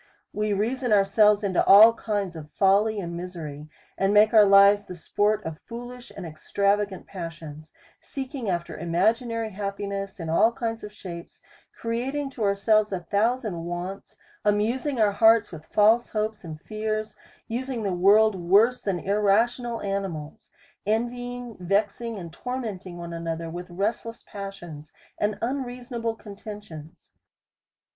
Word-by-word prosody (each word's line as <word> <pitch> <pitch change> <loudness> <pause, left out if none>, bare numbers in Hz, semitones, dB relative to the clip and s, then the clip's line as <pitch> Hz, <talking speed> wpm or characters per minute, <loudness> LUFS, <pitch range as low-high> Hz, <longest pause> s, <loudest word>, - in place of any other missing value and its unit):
We 210 0 -1
reason 240 +5 -1
ourselves 210 +1 +4
into 190 -3 +2
all 215 +4 +9
kinds 205 -6 -3
of 155 -2 -9
folly 205 +4 +2
and 170 -3 -5
misery, 160 -4 -7 0.3
and 195 +1 +2
make 210 +1 +5
our 215 -2 +8
lives 200 +1 +6
the 180 - -9
sport 205 +5 0
of 160 -1 -5
fool 240 +1 -8
ish 250 -1 -12
and 190 - -6
extravagant 200 +4 -1
passions: 160 -4 -8 0.3
Seeking 265 -4 -5
after 175 -2 -2
imagi 195 +9 +1
nary 230 -1 -3
happiness 200 0 -4
in 165 - -5
all 220 +8 +3
kinds 225 -1 -4
of 210 - -7
shapes, 175 -4 -10 0.4
creating 265 +5 -2
to 250 - -9
our 200 -1 +2
selves 215 +1 +2
a 185 -2 -2
thousand 210 -1 0
wants, 175 +3 -6 0.3
amusing 235 +6 0
our 210 -2 +4
hearts 225 +2 +4
with 155 -2 -10
false 220 +3 +4
hopes 215 -1 -2
and 160 -3 -8
fears, 215 0 -3 0.3
using 245 0 -3
the 195 -2 -1
world 205 +4 +5
worse 200 +7 +3
than 195 -3 -1
irrational 220 +5 +1
animals, 195 -7 -4 0.3
envying, 245 +2 -3
vexing 205 +5 -1
and 170 -4 -8
tormenting 210 -7 -5
one 170 0 -7
another 165 0 -4
with 175 +2 -7
restless 215 +5 -3
passions, 175 -7 -9 0.3
and 210 0 0
unreasonable 245 -2 -3
contentions. 205 -7 -11
205 Hz, 140 wpm, -25 LUFS, 180-230 Hz, 0.4 s, all